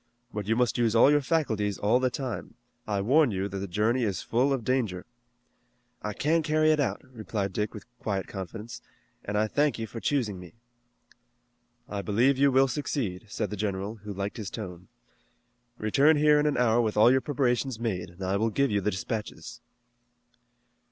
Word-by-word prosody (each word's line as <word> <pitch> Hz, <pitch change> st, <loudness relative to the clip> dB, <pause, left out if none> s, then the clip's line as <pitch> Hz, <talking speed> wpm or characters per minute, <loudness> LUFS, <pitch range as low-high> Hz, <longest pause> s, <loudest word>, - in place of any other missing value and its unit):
But 105 Hz, -1 st, -4 dB
you 115 Hz, -, +2 dB
must 125 Hz, 0 st, +1 dB
use 115 Hz, -2 st, +2 dB
all 120 Hz, +5 st, +7 dB
your 145 Hz, 0 st, +4 dB
faculties 110 Hz, -, 0 dB
all 110 Hz, +5 st, +2 dB
the 130 Hz, 0 st, +1 dB
time. 125 Hz, -3 st, -5 dB, 0.3 s
I 100 Hz, -2 st, 0 dB
warn 140 Hz, +7 st, +4 dB
you 95 Hz, -2 st, -2 dB
that 100 Hz, -1 st, -5 dB
the 100 Hz, -, -4 dB
journey 110 Hz, +7 st, +1 dB
is 100 Hz, -6 st, -1 dB
full 125 Hz, +4 st, +1 dB
of 135 Hz, -4 st, -1 dB
danger." 110 Hz, -7 st, -1 dB, 1.0 s
"I 105 Hz, -, -3 dB
can 160 Hz, +9 st, +1 dB
carry 155 Hz, 0 st, +3 dB
it 155 Hz, -, +2 dB
out," 145 Hz, -, -1 dB
replied 110 Hz, -5 st, -4 dB
Dick 105 Hz, +1 st, -1 dB
with 105 Hz, -, -9 dB
quiet 100 Hz, -3 st, -2 dB
confidence, 110 Hz, +5 st, -7 dB, 0.4 s
"and 105 Hz, +1 st, -2 dB
I 105 Hz, -, +3 dB
thank 145 Hz, +4 st, +1 dB
you 115 Hz, -, -3 dB
for 115 Hz, +1 st, -8 dB
choosing 115 Hz, -8 st, -1 dB
me." 90 Hz, -2 st, -12 dB, 1.3 s
"I 100 Hz, -1 st, -4 dB
believe 120 Hz, +7 st, +2 dB
you 140 Hz, 0 st, +5 dB
will 135 Hz, +1 st, +4 dB
succeed," 120 Hz, -7 st, -3 dB
said 105 Hz, 0 st, -3 dB
the -, -, -2 dB
general, 100 Hz, +1 st, -3 dB
who 105 Hz, 0 st, -8 dB
liked 100 Hz, +1 st, -4 dB
his 105 Hz, -4 st, -5 dB
tone. 90 Hz, -5 st, -7 dB, 0.9 s
"Return 140 Hz, +9 st, +4 dB
here 150 Hz, 0 st, +5 dB
in 150 Hz, -, +2 dB
an 150 Hz, -, 0 dB
hour 120 Hz, -1 st, +3 dB
with 110 Hz, -2 st, -1 dB
all 110 Hz, +3 st, +7 dB
your 130 Hz, 0 st, +3 dB
preparations 130 Hz, -3 st, 0 dB
made, 95 Hz, -7 st, -2 dB
and 90 Hz, +2 st, -10 dB
I 95 Hz, +1 st, 0 dB
will 110 Hz, +2 st, +1 dB
give 140 Hz, +3 st, +1 dB
you 100 Hz, -1 st, +1 dB
the 105 Hz, -, +1 dB
dispatches." 115 Hz, +4 st, -5 dB
115 Hz, 190 wpm, -28 LUFS, 100-130 Hz, 1.3 s, all